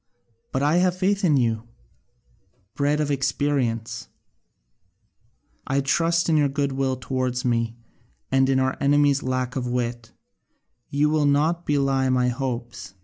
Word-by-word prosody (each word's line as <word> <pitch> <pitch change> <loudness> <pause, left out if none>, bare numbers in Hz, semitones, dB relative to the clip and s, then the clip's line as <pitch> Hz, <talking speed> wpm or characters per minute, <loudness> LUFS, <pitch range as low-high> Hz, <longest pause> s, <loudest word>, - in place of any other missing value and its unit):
But 130 - -1
I 150 +4 +3
have 180 0 +2
faith 200 +2 0
in 155 -6 +4
you, 115 -3 +1 1.1
bred 145 +1 0
of 150 -1 0
experience: 135 -4 -1 1.6
I 135 +1 +1
trust 165 +4 +1
in 160 -2 +3
your 145 -2 +3
goodwill 135 -1 -1
towards 130 0 -2
me, 115 -1 0 0.6
and 135 0 +3
in 135 -1 +3
our 130 0 0
enemy's 145 0 +3
lack 130 -1 -2
of 125 -2 -2
wit; 120 -1 -3 0.8
you 150 +2 +1
will 155 -2 +2
not 155 +5 +1
belie 135 -2 +1
my 125 -1 +2
hopes. 120 -5 -5
135 Hz, 135 wpm, -24 LUFS, 125-145 Hz, 1.6 s, in